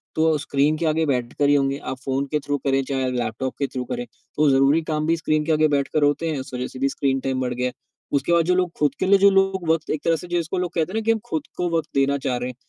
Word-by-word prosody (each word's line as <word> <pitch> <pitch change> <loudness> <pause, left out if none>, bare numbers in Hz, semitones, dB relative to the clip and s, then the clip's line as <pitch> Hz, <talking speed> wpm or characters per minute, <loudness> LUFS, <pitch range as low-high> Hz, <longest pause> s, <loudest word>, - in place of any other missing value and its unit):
तो 160 -1 +3
स्क्रीन 145 +2 +1
के 170 - -2
आगे 160 +1 +1
बैठ 125 -4 -1
कर 145 -1 +3
ही 145 - +5
होंगे 135 -1 +1
आप 130 - -5
फ़ोन 135 +1 0
के 150 - +1
थ्रू 145 0 -2
करें 135 0 +1
चाहे 130 -1 -1
लैपटॉप 125 +1 -2
के 140 - 0
थ्रू 130 -1 -4
करें 245 0 -3 0.3
तो 150 -1 +3
ज़रूरी 135 +4 +4
काम 155 -1 -2
भी 165 - +3
स्क्रीन 155 -1 0
के 165 - 0
आगे 155 0 +4
बैठकर 145 +1 0
होते 145 +3 +1
हैं। 150 -3 -2
इस 130 - -9
वजह 125 0 -3
से 130 - -10
भी 135 +1 +1
स्क्रीन 135 -1 0
टाइम 130 -1 -2
बढ़ 125 -1 -1
गया 125 +1 -1
है। 125 - -5 0.4
उसके 155 - -2
बाद 170 -1 +4
जो 180 +1 +2
लोग 180 -2 +1
खुद 145 -2 +1
के - - +1
लिए 200 +1 +6
जो 200 +1 +7
लोग 195 -2 +1
वक़्त 160 -1 +1
एक 155 - -1
तरह 165 - +3
से 180 - -7
जिसको 175 +1 -2
लोग 180 -2 -1
कहते 165 0 -1
हैं 225 - 0
ना - - -3
कि 225 - +4
हम 225 - 0
खुद 155 -2 -2
को 175 0 0
वक़्त 160 - -3
देना 140 +1 +2
चाह 125 -1 0
रहे 125 +1 -3
हैं 125 - -9
150 Hz, 305 wpm, -23 LUFS, 135-165 Hz, 0.4 s, जो